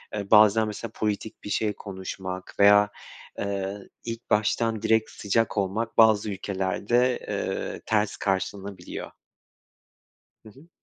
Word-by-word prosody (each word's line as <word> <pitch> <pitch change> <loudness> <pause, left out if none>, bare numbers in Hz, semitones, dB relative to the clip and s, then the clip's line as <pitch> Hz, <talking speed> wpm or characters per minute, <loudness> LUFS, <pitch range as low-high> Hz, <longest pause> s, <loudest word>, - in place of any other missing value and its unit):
e, 100 0 -5
bazen 110 +1 +6
mesela 110 +1 -6
politik 105 0 -3
bir 105 - -6
şey 105 0 0
konuşmak 95 -1 -7
veya, 105 0 +7 0.5
eee, 100 0 -2 0.3
ilk 115 0 -6
baştan 110 +1 +1
direkt 110 0 +2
sıcak 110 +1 -1
olmak 105 +4 -1
bazı 110 -2 +5
ülkelerde, 100 +6 0
eee, - - -3
ters 105 -1 +1
karşılanabiliyor. 95 0 -3 1.3
Hı 110 - -13
hı. 140 +9 -18
105 Hz, 115 wpm, -26 LUFS, 100-110 Hz, 1.3 s, veya